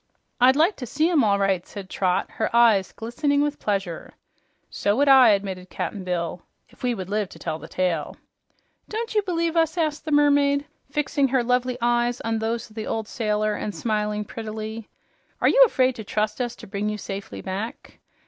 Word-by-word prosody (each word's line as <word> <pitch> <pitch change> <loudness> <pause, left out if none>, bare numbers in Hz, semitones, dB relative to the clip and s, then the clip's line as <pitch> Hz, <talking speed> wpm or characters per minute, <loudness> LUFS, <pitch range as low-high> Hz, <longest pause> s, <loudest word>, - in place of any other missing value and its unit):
"I'd 255 +2 +6
like 330 +7 +3
to 250 - -6
see 310 +8 +1
'em, 305 -7 +4
all 200 -2 +3
right," 195 -3 +1
said 200 -1 -9
Trot, 185 -1 0
her 220 - -1
eyes 220 -5 +5
glistening 285 +6 -1
with 295 0 -2
pleasure. 195 -5 -3 0.5
"So 205 0 0
would 285 +4 +2
I," 265 -3 +8
admitted 190 -3 -1
Cap'n 200 -3 -4
Bill, 175 -1 -3 0.3
"if - - -23
we 245 -1 0
would 190 -4 -6
live 205 -1 -1
to - - -13
tell 155 - -4
the 160 - -10
tale." 175 -4 -2 0.7
"Don't 455 +2 -3
you 425 - +3
believe 335 -3 -1
us?" 325 0 +2
asked 310 -2 -1
the 310 - -3
mermaid, 285 -1 +3 0.2
fixing 280 -1 +1
her 260 -1 +1
lovely 250 +1 0
eyes 240 0 +1
on 225 -1 -1
those 225 +1 -2
of 215 - -20
the 220 - -5
old 220 -1 -2
sailor 215 -2 0
and 210 0 -4
smiling 210 -1 -1
prettily. 220 0 -6 0.5
"Are - - +3
you - - +5
afraid 260 - +2
to 220 - -6
trust 215 +3 -1
us 240 -1 -2
to - - -12
bring 205 +1 -3
you 210 - -3
safely 195 -1 -6
back?" 200 +4 -6
225 Hz, 195 wpm, -24 LUFS, 205-275 Hz, 0.7 s, I